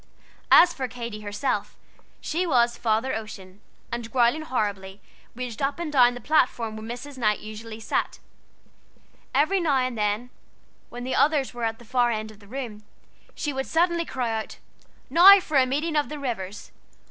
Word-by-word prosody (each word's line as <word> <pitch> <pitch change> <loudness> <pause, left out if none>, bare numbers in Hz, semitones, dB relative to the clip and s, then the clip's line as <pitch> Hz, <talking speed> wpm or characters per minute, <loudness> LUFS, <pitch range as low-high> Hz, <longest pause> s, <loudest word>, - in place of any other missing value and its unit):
As 345 0 +8
for 265 -4 -3
Katy 235 -4 -7
herself, 210 +6 -3 0.4
she 350 +3 -1
was 240 -5 +3
"Father 230 +3 0
Ocean," 205 -3 -8 0.3
and, 235 -1 -5
growling 245 +5 +3
horribly, 205 -8 -3 0.4
raged 245 -3 -6
up 275 +3 0
and 335 -3 -4
down 245 -3 +5
the - - -7
platform 245 -5 +1
where 220 - -8
Mrs. 260 +3 -7
Knight 215 -3 +2
usually 215 +1 -9
sat. 220 - -2 1.2
Every 315 +8 +3
now 315 -5 +1
and 255 -1 -1
then, 210 +3 -1 0.6
when 245 0 -7
the 255 - -3
others 290 -4 +2
were 240 -1 -3
at 225 0 -2
the 240 - -16
far 245 +1 +2
end 215 -1 -3
of 210 - -17
the 200 - -17
room, 230 -3 -6 0.5
she 295 -2 -3
would 265 0 -3
suddenly 340 +1 +2
cry 250 -5 -2
out, - - -11 0.5
"Now 370 +7 +9
for 310 -5 -1
a 260 -1 +4
meeting 305 +5 -1
of 295 -1 +1
the 300 0 -6
waters!" 210 -7 -5
245 Hz, 170 wpm, -25 LUFS, 220-285 Hz, 1.2 s, Now